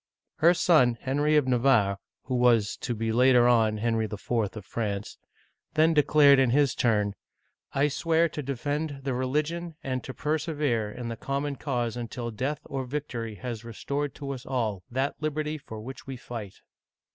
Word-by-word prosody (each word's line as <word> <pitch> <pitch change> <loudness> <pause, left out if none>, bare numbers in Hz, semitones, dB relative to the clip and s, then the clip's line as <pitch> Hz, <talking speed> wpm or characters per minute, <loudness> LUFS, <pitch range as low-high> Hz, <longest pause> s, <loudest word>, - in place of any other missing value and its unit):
Her 170 +3 +5
son, 130 -10 +4
Henry 145 +3 +1
of 145 -3 +2
Navarre 120 -6 +3 0.2
(who 130 - -4
was 120 -4 +3
to 120 - -3
be 115 +1 -1
later 125 +1 +5
on 110 -3 +3
Henry 115 0 0
IV. 105 +1 -8
of 110 -3 -1
France), 105 -3 -4 0.6
then 160 +1 +4
declared, 145 -2 +6
in 130 -2 +4
his 135 0 +3
turn: 105 -4 +1 0.3
" - - -41
I 145 - +5
swear 165 +3 +2
to 150 -1 -5
defend 145 +2 -3
the 135 -1 -1
religion, 150 +6 -2
and 130 -1 -2
to - - -6
persevere 150 -8 -1
in 120 +1 -6
the 115 - -5
common 140 +3 -2
cause 120 -5 -2
until 120 0 -5
death 130 +7 -3
or 135 -1 -3
vic 145 +3 -4
tory 115 -3 -5
has 120 0 -6
restored 140 +5 -4
to 140 -1 -5
us 130 -3 -6
all 115 -7 -2
that 135 +3 -1
liberty 155 0 -2
for 110 -6 -9
which 130 +5 -9
we 135 -1 -5
fight." 115 -5 -7
130 Hz, 175 wpm, -27 LUFS, 115-145 Hz, 0.6 s, declared